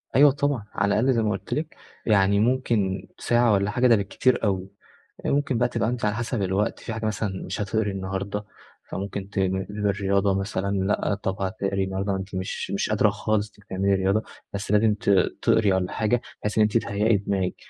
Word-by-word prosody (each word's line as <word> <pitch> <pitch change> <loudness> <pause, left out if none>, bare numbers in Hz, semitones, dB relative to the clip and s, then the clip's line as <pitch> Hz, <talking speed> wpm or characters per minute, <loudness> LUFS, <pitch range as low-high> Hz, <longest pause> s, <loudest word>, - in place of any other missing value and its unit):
أيوه 145 +2 +7
طبعًا، 140 -4 -1
على 100 0 +1
الأقل 130 +3 +3
زي 115 - +2
ما 105 - +1
قُلت 95 - -4
لِك 155 +1 -3 0.3
يعني 100 -2 +4
ممكن 110 -5 +1
ساعة 120 -2 +3
والَّا 100 +1 +1
حاجة 125 +3 +3
ده 115 - +6
بالكتير 100 +5 +1
أوي، 95 -2 0 0.6
ممكن 140 -3 +1
بقى 120 +1 +2
تبقى 115 - 0
أنتِ 120 -2 -2
على 105 0 +1
حسب 120 0 -2
الوقت، 95 +2 0
في 115 - -6
حاجة 110 0 -4
مثلًا 100 -2 -2
مش 95 +3 -4
هتقري 105 +1 0
النهاردة، 95 +2 -4 0.4
فممكن 100 0 -5
ت 100 - -12 0.3
للرياضة 100 -1 +1
مثلًا 95 0 -2
لأ، 95 +1 0
طب 95 0 -4
هتقري 95 0 -1
النهاردة 95 +1 -2
أنتِ 95 0 -6
مش 95 0 -4
مش 100 - -1
قادرة 110 0 +3
خالص 105 0 -1 0.2
تعملي 95 +1 +1
رياضة، 95 +3 +1 0.3
بس 100 0 -4
لازم 105 +1 +4
ت 100 - -3 0.3
تقري 105 -4 +3
والَّا 95 -1 0
حاجة 115 +2 +1 0.2
بحيث 105 +1 -2
إن 110 - +5
أنتِ 105 +2 +2
تهيأي 105 0 +1
دماغك. 95 -2 -1
100 Hz, 185 wpm, -25 LUFS, 95-110 Hz, 0.6 s, أيوه